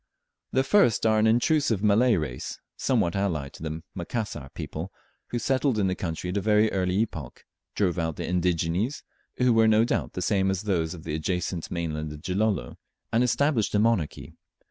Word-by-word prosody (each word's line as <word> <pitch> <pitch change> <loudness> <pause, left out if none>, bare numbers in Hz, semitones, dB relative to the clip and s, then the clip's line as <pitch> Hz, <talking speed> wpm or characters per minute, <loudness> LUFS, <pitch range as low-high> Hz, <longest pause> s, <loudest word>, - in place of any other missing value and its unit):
The 130 - +2
first 135 - +3
are 110 -1 +4
an 110 - +4
intrusive 120 -2 +2
Malay 110 +3 +4
race 75 -8 -4 0.2
somewhat 85 +1 +1
allied 80 -8 -1
to - - -13
the 80 0 -5
Macassar 90 - -4
people, - - -5 0.4
who 120 - -3
settled 130 0 +1
in 100 - +2
the 95 - +1
country 90 0 -4
at 100 - -2
a - - +1
very 105 +1 +3
early 90 -1 0
epoch, 80 - -5 0.3
drove 90 -3 +1
out 80 -2 -1
the - - -4
indigenes, 90 - 0 0.3
who 125 -1 +3
were 115 0 +5
no 110 +1 +5
doubt - - -1
the 90 - -3
same 95 0 +2
as 95 +1 -1
those 85 -5 0
of 80 - -11
the 80 - -4
adjacent 90 +1 -2
mainland 80 -3 -3
of 75 0 -10
Gilolo, 95 - -1 0.4
and 115 +2 +4
established 125 -3 +1
a - - +4
monarchy. 110 -8 0
95 Hz, 185 wpm, -26 LUFS, 85-110 Hz, 0.4 s, were